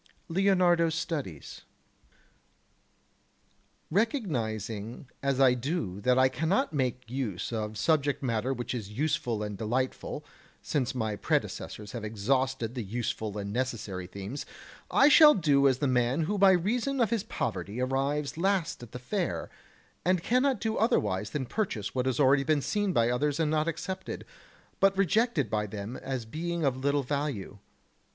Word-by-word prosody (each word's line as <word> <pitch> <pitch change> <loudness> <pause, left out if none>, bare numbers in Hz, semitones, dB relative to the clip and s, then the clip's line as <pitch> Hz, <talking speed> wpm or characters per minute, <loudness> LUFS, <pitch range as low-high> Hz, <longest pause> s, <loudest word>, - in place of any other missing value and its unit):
[Sidenote: 165 - -7
Leonardo's 180 -4 +3
Studies] 145 - -4 2.3
4. 175 - +1
Recognizing 115 - -2
as 140 -1 0
I 130 -2 +6
do 125 - -3
that 125 +4 +3
I 130 0 +6
cannot 160 - 0
make 125 -4 -1
use 120 -5 -3
of 110 -1 -3
subject 145 +3 +1
matter 120 0 0
which 120 -1 -3
is 110 -5 -5
useful 120 -3 -1
and 105 -1 -4
delightful, 125 +4 -2 0.4
since 135 -2 -1
my 110 -4 -1
predecessors 105 0 -2
have 120 -3 -6
exhausted 120 +3 0
the 125 - -3
useful 110 -1 -3
and 100 0 -4
necessary 110 -7 -3
themes, 100 +8 -6 0.5
I 280 - +5
shall 300 0 +8
do 145 -7 +4
as 130 -2 +3
the 145 - 0
man 125 +3 +2
who 200 +6 -1
by 195 -1 +7
reason 240 +9 0
of 230 -4 +2
his 230 -4 +1
poverty 105 +5 -3
arrives 140 +4 -1
last 185 -4 0
at 120 - -11
the - - -4
fair, 175 +8 -3 0.5
and 180 -1 +2
cannot 255 0 +2
do 220 +1 -1
otherwise 105 - +1
than 135 +2 -3
purchase 125 - -2
what 130 0 0
has 130 - 0
already 135 0 +5
been 150 -1 +1
seen 205 -2 0
by 115 -7 +2
others 145 +4 0
and 155 -2 +1
not 155 0 +1
accepted, 185 +3 -4 0.5
but 195 0 +4
rejected 195 - +2
by 105 0 -1
them 105 +3 -6
as 130 -3 -4
being 165 +6 -3
of 135 -2 +2
little 140 +2 0
value. 140 -8 -3
135 Hz, 155 wpm, -29 LUFS, 115-170 Hz, 2.3 s, shall